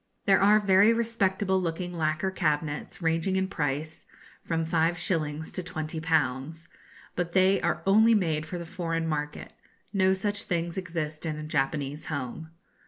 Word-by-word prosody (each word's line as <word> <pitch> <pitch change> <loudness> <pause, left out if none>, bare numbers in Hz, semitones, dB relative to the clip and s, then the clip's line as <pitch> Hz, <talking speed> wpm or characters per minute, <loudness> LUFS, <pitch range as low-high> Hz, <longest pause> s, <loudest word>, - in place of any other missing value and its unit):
There 195 - +5
are 210 +2 +6
very 200 +2 +5
respectable 200 -4 +1
looking 175 +1 -3
lacquer 160 +3 0
cabinets 155 -1 -2
ranging 165 +3 +1
in 190 0 +1
price 155 -3 -3 0.4
from 165 -1 -1
5_s_. 160 -2 0
to - - -3
20_l_. 160 -2 -2 0.5
But 170 -1 -2
they 190 +1 +4
are - - -1
only 220 +4 +6
made 160 -6 0
for 175 - -5
the 170 - -6
foreign 165 -2 -2
market. 150 -1 -4 0.4
No 190 -1 +3
such 205 +2 -2
things 170 -1 -2
exist 165 -5 -4
in 155 -2 -3
a 155 - -6
Japanese 145 -1 -2
home. 145 +2 -5
165 Hz, 145 wpm, -27 LUFS, 155-190 Hz, 0.5 s, are